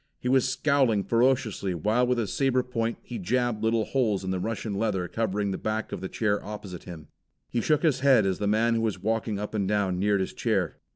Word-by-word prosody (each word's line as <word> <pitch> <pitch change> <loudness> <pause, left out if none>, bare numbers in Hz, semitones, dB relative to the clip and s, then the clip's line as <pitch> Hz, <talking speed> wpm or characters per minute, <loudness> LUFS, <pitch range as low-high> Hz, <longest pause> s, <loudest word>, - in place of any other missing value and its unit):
He - - -4
was 130 0 +3
scowling 130 -7 +2
ferociously 115 -4 +1
while 110 +9 +1
with 125 0 +1
his 110 -5 -2
saber 130 -2 +2
point 115 -2 -2
he 120 -2 -6
jabbed 120 +3 0
little 110 -1 +2
holes 110 -8 0
in 95 - -2
the 95 - -1
Russian 110 +1 -3
leather 100 -3 -1
covering 105 -2 -1
the - - -3
back 110 +1 -2
of - - -5
the 95 - -4
chair 105 -2 0
opposite 100 -3 -8
him. 80 -4 -10 0.4
He 120 - 0
shook 150 +5 +1
his 150 -6 +3
head 130 -6 +5
as 95 -1 0
the 105 - -1
man 110 +3 +2
who 115 - +1
was 110 -3 -1
walking 110 0 -1
up 105 +2 -5
and 100 -3 0
down 100 -3 0
neared 100 0 +2
his 95 - -3
chair. - - -1
110 Hz, 225 wpm, -27 LUFS, 100-120 Hz, 0.4 s, head